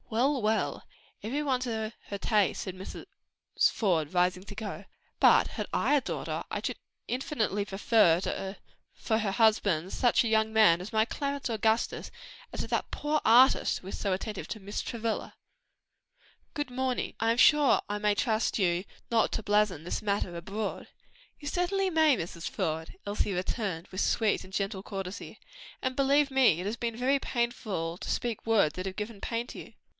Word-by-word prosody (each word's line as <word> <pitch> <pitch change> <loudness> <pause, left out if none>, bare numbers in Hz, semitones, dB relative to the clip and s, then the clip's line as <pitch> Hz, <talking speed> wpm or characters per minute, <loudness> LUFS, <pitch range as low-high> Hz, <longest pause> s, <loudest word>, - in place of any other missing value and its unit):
"Well, 260 +4 +1
well, 215 +1 0 0.4
every 260 +8 -2
one 265 -4 0
to 220 -3 -3
her 200 - -4
taste!" 210 -1 +1
said 185 -2 -6
Mrs. 185 +1 -8 0.7
Faude, 170 -7 0
rising 180 +1 +2
to 205 0 -10
go, 205 -2 -6 0.4
"but - - +6
had - - -4
I - - +1
a 285 - +3
daughter, - - -4
I - - -1
should - - -3 0.3
infinitely 230 -5 -1
prefer 195 -2 +2 0.4
for 220 -1 -1
her 210 -3 -1
husband, 200 -6 +2
such 245 -1 +3
a - - -1
young 220 0 +2
man 215 -6 +5
as 190 - -7
my 220 -1 +3
Clarence 280 +1 -3
Augustus 220 0 0
to - - -18 0.4
such - - -1
as - - -12
that - - -1
poor 300 +1 0
artist 245 +4 +5
who 185 - -13
is - - -5
so 200 - -1
attentive 200 +2 -4
to 215 - -5
Miss 200 +1 -4
Travilla. 230 -2 -3 1.2
"Good 290 -4 -3
morning. 255 0 -1
I 225 0 +3
am 230 - 0
sure 295 +1 +5
I 205 - -2
may 210 0 +1
trust 220 -1 0
you 175 -2 +1 0.3
not 230 -1 +2
to 220 - -2
blazon 205 -6 +2
this 175 - -3
matter 200 -4 -1
abroad?" 195 +5 -4 0.5
"You 290 - -8
certainly 375 +4 0
may, 315 -6 +4
Mrs. 170 0 -5
Faude," 160 0 -3
Elsie 205 0 -1
returned 185 -1 -3
with 185 - -3
sweet 220 -3 +1
and 185 - -13
gentle 195 0 -2
courtesy, 195 +1 -6 0.4
"and 260 -1 -1
believe 280 +1 +3
me, 260 -11 +4
it 180 - -4
has 210 +3 -2
been 230 -1 -3
very 265 +3 +2
painful 215 -10 -2
to - - -7
me - - -4
to - - +2
speak 235 -3 -3
words 215 -9 +3
that 185 +1 -4
have 190 - -5
given 210 -1 -5
pain 230 0 -2
to - - -9
you." - - -11
220 Hz, 185 wpm, -29 LUFS, 195-245 Hz, 1.2 s, but